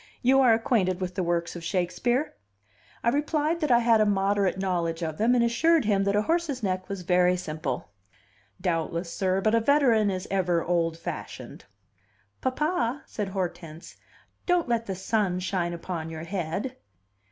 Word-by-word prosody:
"You 265 +2 +5
are 250 -3 +6
acquainted 220 -5 +1
with 185 -1 -3
the 190 - -2
works 170 -1 -1
of 170 - -7
Shakespeare?" 220 - 0 0.7
I 235 - +3
replied 300 +4 0
that 305 -3 -1
I 240 - +6
had 230 -2 +4
a - - +4
moderate 195 -1 +1
knowledge 175 -3 -1
of 160 -1 -4
them, 235 +3 +3
and 240 - +3
assured 300 +5 +3
him 200 -2 +2
that 200 0 +1
a 210 - +2
horse's 315 -4 -1
neck 185 -1 -2
was 195 -2 -5
very 180 0 +3
simple. 155 - -4 0.7
"Doubtless, 170 -1 -2
sir; 190 0 0
but 215 +2 +2
a 230 - +5
veteran 230 -4 +3
is 185 -1 -3
ever 180 -3 +1
old 165 -1 0
fashioned." - - -7 0.8
"Papa," 265 -1 -1
said 210 -2 -4
Hortense, 175 -4 -5 0.5
"don't 355 -3 +2
let 230 -1 0
the 190 - -3
sun 190 -1 0
shine 180 -2 -1
upon 170 -1 -5
your 160 0 -6
head." 195 +8 -3
195 Hz, 165 wpm, -26 LUFS, 175-235 Hz, 0.8 s, are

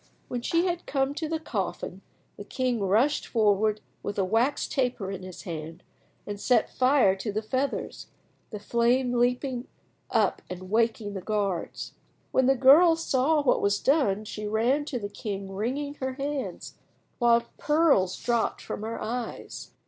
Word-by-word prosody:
When 245 - -3
she 335 +8 +1
had 350 -1 -2
come 270 0 0
to 315 +1 -4
the 320 0 -1
coffin 195 - -4 0.3
the - - -8
king 250 +2 -1
rushed 215 +9 +2
forward 215 -1 +2 0.2
with 205 - -5
a 195 - +2
wax 230 +8 +1
taper 245 -7 -1
in 195 -1 -6
his 185 -1 -9
hand 160 -1 -7 0.4
and 205 -1 -6
set 245 -4 +2
fire 255 -7 +4
to 210 +2 -3
the 215 +2 -2
feathers, 260 +5 -3 0.4
the 215 - -6
flame 240 +4 +1
leaping 245 +1 0 0.4
up - - +1
and 185 +1 -8
waking 225 -2 +1
the 190 - -5
guards. 200 -4 -2 0.4
When 260 -1 +3
the 270 - +5
girl 295 +7 +7
saw 300 -1 +1
what 260 - +3
was 200 0 +2
done 215 -8 +2
she 210 0 -5
ran 240 +7 +1
to 275 - -3
the 205 -4 -4
king 200 -1 -6
wringing 265 +8 -2
her 260 0 -1
hands, 275 +1 -5 0.4
while 235 -1 +4 0.2
pearls 295 - +3
dropped 235 -2 0
from - - -6
her 225 +1 -4
eyes. 235 +2 -5
235 Hz, 160 wpm, -27 LUFS, 205-270 Hz, 0.4 s, girl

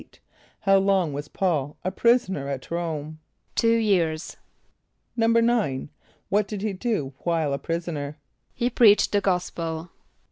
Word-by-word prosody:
= - - -32
How 195 -2 +5
long 190 -5 +2
was 145 +1 -5
P[a:]ul 150 -6 -1
a 185 - -1
prisoner 195 - +2
at 135 +1 -5
R[=o]me? 160 -3 -3 0.4
=Two 230 0 +3
years.= 175 -8 0 0.8
=9.= 230 - +2 0.4
What 205 +1 +2
did 210 -2 -5
he 215 -2 -1
do 185 - -2
while 165 -4 0
a 140 - -2
prisoner? 165 -3 -4 0.4
=He 245 +1 0
preached 215 -4 +5
the 205 - +2
gospel. 170 -3 -2
180 Hz, 135 wpm, -25 LUFS, 155-210 Hz, 0.8 s, How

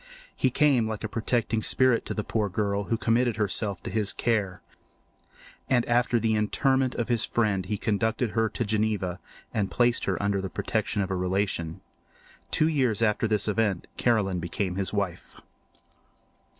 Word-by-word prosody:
He 130 - +2
came 130 -4 +3
like 110 -1 -4
a - - -1
protecting 115 0 -1
spirit 130 +1 +2
to - - -3
the 105 - -2
poor 105 -2 -1
girl, 100 +1 -1
who 115 - 0
committed 120 0 +2
herself 100 -2 -1
to - - -5
his 105 -2 0
care; 100 -6 -1 1.1
and 120 -2 +3
after 120 0 +2
the 110 0 +1
interment 130 +5 +1
of 120 - -1
his 120 -3 +1
friend 105 -5 0
he 105 - -1
conducted 110 +3 0
her 115 0 +1
to 120 - -3
Geneva 105 -4 -1 0.3
and 100 -3 0
placed 120 0 +2
her 95 - -1
under 100 -1 0
the 95 - -4
protection 100 - -1
of 95 - -4
a - - 0
relation. 90 -3 -1 0.7
Two 155 - +2
years 130 -8 +1
after 110 +1 +2
this 105 -2 0
event 105 -3 0
Caroline 105 -6 +1
became 90 +2 -3
his 95 0 -2
wife. 100 -5 -3
110 Hz, 165 wpm, -27 LUFS, 100-120 Hz, 1.1 s, came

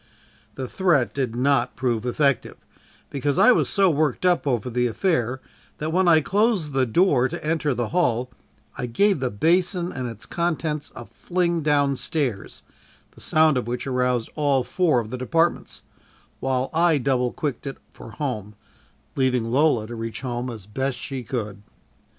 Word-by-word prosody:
The 130 -1 -4
threat 160 -7 +1
did 130 -5 -2
not 125 -1 +1
prove 120 -2 -1
effective, 140 +1 0 0.5
because 140 0 -1
I 250 - +7
was - - +2
so 195 -2 +3
worked 155 +2 0
up 175 -4 +2
over 120 -4 0
the 125 0 0
affair 130 - 0 0.4
that 155 +1 -3
when 185 +1 +3
I 160 -2 +6
closed 195 -3 +1
the 130 -1 +2
door 135 - +3
to 170 +2 -7
enter 155 -3 0
the 120 -3 -2
hall, 125 -8 0 0.4
I 125 - -4
gave 195 - +2
the 130 -1 -1
basin 175 - +1
and 130 -1 -4
its 115 -2 -9
contents 160 -3 -2
a - - -8
fling 175 -2 -1
down 145 -2 +2
stairs, 135 - -3 0.5
the - - -16
sound 155 -3 +3
of 125 - -2
which 120 +1 -3
aroused 125 -3 0
all 140 -4 +1
four 160 -3 +2
of 110 -1 -9
the 130 - -4
departments, 165 +6 0 0.6
while 130 0 -1
I 165 -1 +3
double 125 -2 0
quicked 145 -4 -4
it 135 - -5 0.2
for - - -11
home 110 -6 -4 0.6
leaving 125 -4 +1
Lola 135 -4 +3
to 120 - -8
reach 115 0 -5
home 125 -1 -3
as 110 -5 -8
best 130 +5 -3
she 130 +2 -5
could. 105 -4 -4
135 Hz, 170 wpm, -23 LUFS, 125-160 Hz, 0.6 s, I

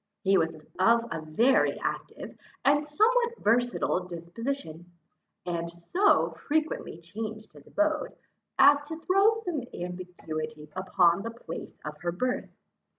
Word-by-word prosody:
He 195 0 +4
was 165 -2 +2 0.2
of 230 +4 +4
a 165 - -3
very 225 +13 +3
active, - - -5 0.3
and 285 +2 +4
somewhat 470 +10 +2
versatile 235 -5 +1
disposition, 175 - -5 0.5
and 170 -1 -2
so 350 - +2
frequently 310 - -2
changed 215 +5 -7
his 145 -2 -16
abode, 310 +11 0 0.4
as 285 0 +7
to 320 +1 -5
throw 390 +5 +4
some 330 -6 -1
ambiguity 160 -4 -6
upon 185 -1 +3
the 230 - -4
place 230 -8 -8
of 150 0 -5
her 175 - -1
birth. 250 +9 -2
205 Hz, 125 wpm, -28 LUFS, -, 0.5 s, as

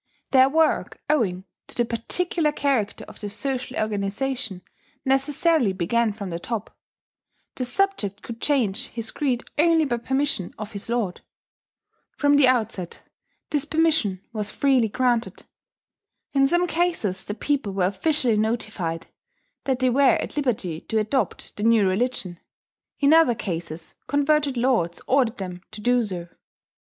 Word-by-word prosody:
Their 260 0 +6
work, 320 +2 +1
owing 190 -11 0 0.2
to - - -6
the 240 - +2
particular 300 +8 -1
character 270 -9 -1
of - - -13
the 205 - -5
social 260 +4 -3
organization, 210 0 -2 0.4
necessarily 270 - +2
began 220 +6 +1
from 200 -3 -6
the 170 - -3
top: 225 +3 -5 0.8
the 255 - -3
subject 245 - -1
could 230 -1 -8
change 250 -4 +1
his 230 -1 -6
creed 255 -5 -1 0.2
only 325 0 +4
by 240 -4 0
permission 265 -5 -1
of 215 0 -6
his 200 +2 -7
lord. 230 -7 -1 1.0
From 285 0 +4
the 285 -2 +6
outset 220 -8 -1 0.5
this 295 -2 +1
permission 300 - +1
was 210 -2 -2
freely 265 -3 +2
granted. 245 0 0 0.9
In 275 -1 +4
some 345 +4 +2
cases 330 - 0
the 205 - -5
people 280 -5 -1
were 190 -2 +1
officially 235 - +1
notified 215 -7 -2 0.6
that 265 -2 +1
they 255 0 +2
were 275 +1 +5
at - - -5
liberty 205 - -1
to 225 - -2
adopt 220 +5 -1
the - - -5
new 225 -3 +4
religion; 190 -3 -1 0.6
in 285 +1 +5
other 320 -7 +5
cases, 165 -5 -5
converted 290 -1 +2
lords 235 -9 +1
ordered 255 -3 +2
them 180 -2 -6
to 220 - -9
do 245 +3 +3
so. 180 -6 -4
240 Hz, 145 wpm, -24 LUFS, 200-280 Hz, 1.0 s, Their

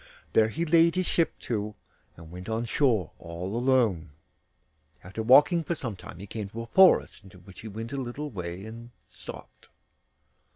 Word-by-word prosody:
There 110 - +5
he 165 +9 -2
laid 165 +1 +4
his 185 0 0
ship 165 -2 0
to, 105 -2 -3 0.4
and 80 -1 -12
went 90 +3 -8
on 110 +1 -1
shore 115 - +1
all 90 +4 -6
alone. 120 -10 +2 0.9
After 95 +5 -6
walking 145 +8 +5
for 170 - -2
some 120 -8 -5
time 90 - -11
he 95 - -8
came 105 0 -6
to 115 +3 -6
a - - -8
forest, 185 - +4
into 95 -1 -15
which 90 +1 -14
he 110 - -8
went 115 +4 -7
a - - -3
little 135 +3 -5
way 90 -1 -6
and 115 +2 -10 0.2
stopped. 75 - -12
110 Hz, 175 wpm, -27 LUFS, 95-135 Hz, 0.9 s, There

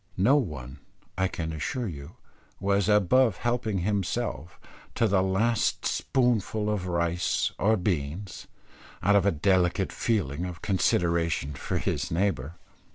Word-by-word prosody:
No 110 +10 +4
one, 70 - -3 0.4
I 95 +1 +1
can 80 -3 -4
assure 115 - -3
you, 80 +2 -8 0.4
was 100 +1 +1
above 105 +2 +4
helping 120 -4 -1
himself, 95 - -2 0.4
to 115 - +3
the 100 -2 +3
last 105 +5 +1
spoonful 110 -4 0
of 95 -4 -2
rice 85 0 0
or 110 +2 +3
beans, 90 0 -3 0.6
out 100 +3 +4
of 100 -1 +4
a - - +4
delicate 90 +2 +1
feeling 90 - -1
of 90 -1 -7
consideration 85 - +1
for 70 - -3
his - - -2
neighbour. 85 -4 -1
95 Hz, 130 wpm, -27 LUFS, 85-105 Hz, 0.6 s, No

